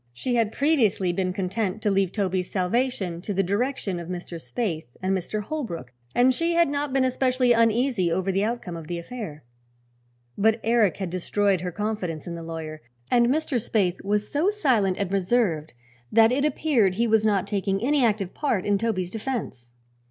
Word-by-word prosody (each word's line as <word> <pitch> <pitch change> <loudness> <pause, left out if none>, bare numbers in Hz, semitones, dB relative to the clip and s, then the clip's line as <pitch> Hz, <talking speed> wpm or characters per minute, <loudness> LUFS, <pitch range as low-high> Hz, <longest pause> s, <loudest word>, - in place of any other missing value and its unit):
She 245 - -2
had 230 -3 +2
previously 225 - +2
been 185 0 0
content 195 +2 -2
to 210 - +2
leave 195 -2 +2
Toby's 185 -3 -1
salvation 190 -3 -1
to 200 +2 -4
the 195 - +2
direction 200 -1 -1
of 170 - -7
Mr. 175 -1 -5
Spaythe 175 - -3
and 190 +1 0
Mr. 210 +3 -3
Holbrook 185 - -5 0.2
and 255 +1 +5
she 335 +5 0
had 340 -2 +4
not 285 0 -2
been 270 0 +2
especially 255 -1 +2
uneasy 230 -4 +2
over 190 +3 0
the 195 +2 +1
outcome 220 -6 -3
of 165 -2 -8
the 175 - -3
affair. 170 -5 -7 0.9
But 220 +2 +3
Eric 225 -6 +3
had 190 -4 -4
destroyed 190 +1 +1
her 180 0 -3
confidence 190 -6 -3
in 175 - -5
the 170 - -6
lawyer, 160 -2 -6 0.3
and 240 -1 +5
Mr. 275 -2 0
Spaythe 195 -5 0
was 210 +1 0
so 310 +7 +2
silent 250 - +1
and 195 -2 -2
reserved 185 -6 +1 0.4
that 225 +1 +6
it 280 +3 +1
appeared 265 - +2
he 230 +4 +2
was 220 -1 +3
not 200 -3 +2
taking 195 -1 -1
any 285 +1 +3
active 205 -5 +1
part 240 -11 -1
in 205 -1 +2
Toby's 190 -6 -1
defense. 210 - -5
205 Hz, 180 wpm, -25 LUFS, 180-245 Hz, 0.9 s, that